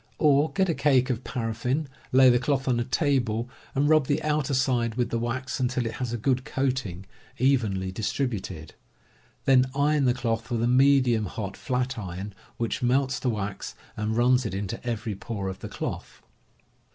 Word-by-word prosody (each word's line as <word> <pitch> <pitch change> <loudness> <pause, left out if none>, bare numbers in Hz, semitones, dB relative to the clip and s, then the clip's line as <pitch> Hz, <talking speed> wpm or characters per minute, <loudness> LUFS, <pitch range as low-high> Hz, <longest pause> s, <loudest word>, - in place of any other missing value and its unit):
Or, 150 0 +4
get 190 -1 +2
a 170 - +1
cake 135 -4 +3
of 125 0 -3
paraffin, 125 +5 -2 0.2
lay 130 0 +7
the 120 - +3
cloth 135 +1 0
on 125 -2 +2
a - - +1
table, 125 -4 0 0.3
and 140 +2 +2
rub 155 -3 +4
the 145 +1 +1
outer 150 -3 0
side 120 -3 +1
with 120 -1 -1
the 115 - 0
wax 125 +3 -3
until 125 -1 0
it 115 - -2
has 125 -2 -2
a 120 - -2
good 130 +3 0
coating, 130 -10 -2 0.3
evenly 110 -8 +1
distributed. 100 - -3 0.7
Then 130 -1 +5
iron 145 0 +2
the 125 -1 +3
cloth 115 -2 -2
with 115 -2 0
a - - +3
medium 125 -4 +4
hot 100 0 -5
flatiron, 110 -7 -3 0.2
which 115 -1 -2
melts 130 +1 +1
the 125 - 0
wax 105 -3 -4 0.2
and 110 +1 -2
runs 125 +1 +4
it 105 -5 -3
into 100 +3 -4
every 115 -2 -3
pore 100 -1 -4
of 95 - -7
the - - -7
cloth. - - -6
125 Hz, 175 wpm, -26 LUFS, 110-135 Hz, 0.7 s, lay